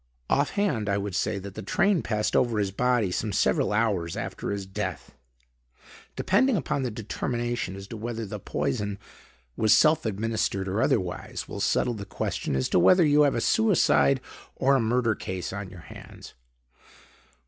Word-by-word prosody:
Offhand, 140 Hz, -, +1 dB
I 100 Hz, -, +1 dB
would 100 Hz, -1 st, -4 dB
say 105 Hz, +1 st, 0 dB
that 100 Hz, 0 st, -7 dB
the 110 Hz, -, -7 dB
train 180 Hz, -, +2 dB
passed 105 Hz, -1 st, -1 dB
over 120 Hz, -3 st, +2 dB
his 100 Hz, -2 st, 0 dB
body 120 Hz, -2 st, +1 dB
some 105 Hz, +3 st, -2 dB
several -, -, +1 dB
hours 105 Hz, -6 st, 0 dB
after -, -, -4 dB
his 100 Hz, -1 st, -3 dB
death. 95 Hz, -, -5 dB, 1.0 s
Depending 225 Hz, +5 st, +2 dB
upon 145 Hz, -, -1 dB
the 130 Hz, -, -1 dB
determination 120 Hz, -1 st, -3 dB
as 95 Hz, 0 st, -8 dB
to 115 Hz, -, -6 dB
whether 115 Hz, +1 st, -4 dB
the 95 Hz, -, -6 dB
poison 100 Hz, +7 st, -2 dB, 0.6 s
was 110 Hz, -1 st, +4 dB
self 155 Hz, 0 st, +4 dB
administered 105 Hz, -2 st, -1 dB
or 100 Hz, +4 st, -1 dB
otherwise, 90 Hz, -4 st, -1 dB
will -, -, -6 dB
settle 125 Hz, -, +1 dB
the 100 Hz, -3 st, -7 dB
question 95 Hz, -, -3 dB
as 65 Hz, -, 0 dB
to -, -, +3 dB
whether 180 Hz, -, +6 dB
you 150 Hz, 0 st, +4 dB
have 145 Hz, -2 st, +3 dB
a -, -, 0 dB
suicide 185 Hz, -, +3 dB, 0.3 s
or 135 Hz, +1 st, +2 dB
a -, -, +3 dB
murder 115 Hz, 0 st, +1 dB
case 95 Hz, -2 st, -5 dB
on 100 Hz, -1 st, -5 dB
your 90 Hz, -2 st, -12 dB
hands." -, -, -12 dB
110 Hz, 170 wpm, -26 LUFS, 100-125 Hz, 1.0 s, whether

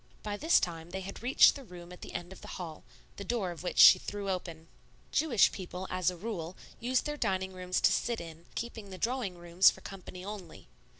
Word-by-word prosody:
By 210 Hz, -1 st, -3 dB
this 320 Hz, +11 st, +4 dB
time 165 Hz, -1 st, -4 dB
they 190 Hz, +2 st, -5 dB
had 195 Hz, +1 st, -8 dB
reached 250 Hz, +3 st, +6 dB
the 280 Hz, -, -9 dB
room 175 Hz, -5 st, -11 dB
at 180 Hz, -, -13 dB
the -, -, -9 dB
end 175 Hz, +2 st, -5 dB
of -, -, -14 dB
the -, -, -10 dB
hall, 165 Hz, -4 st, -7 dB, 0.3 s
the 200 Hz, -, -5 dB
door 200 Hz, -4 st, -1 dB
of 170 Hz, -, -8 dB
which 180 Hz, -, -4 dB
she 185 Hz, -, +10 dB
threw 200 Hz, 0 st, -4 dB
open. 170 Hz, -3 st, -5 dB, 0.5 s
Jewish 280 Hz, -9 st, +4 dB
people, 185 Hz, -1 st, -6 dB
as 185 Hz, -1 st, +1 dB
a 180 Hz, -, -6 dB
rule, 180 Hz, -4 st, -5 dB, 0.2 s
use 250 Hz, +2 st, +1 dB
their 295 Hz, 0 st, -4 dB
dining 190 Hz, -5 st, -1 dB
rooms 180 Hz, 0 st, -1 dB
to -, -, +5 dB
sit 235 Hz, -1 st, 0 dB
in, 165 Hz, 0 st, -10 dB
keeping 225 Hz, -3 st, -5 dB
the 185 Hz, -, -8 dB
drawing 230 Hz, -5 st, -2 dB
rooms 175 Hz, +2 st, +5 dB
for 190 Hz, -, -8 dB
company 185 Hz, -1 st, -9 dB
only. 195 Hz, -, -8 dB
185 Hz, 220 wpm, -31 LUFS, 175-215 Hz, 0.5 s, she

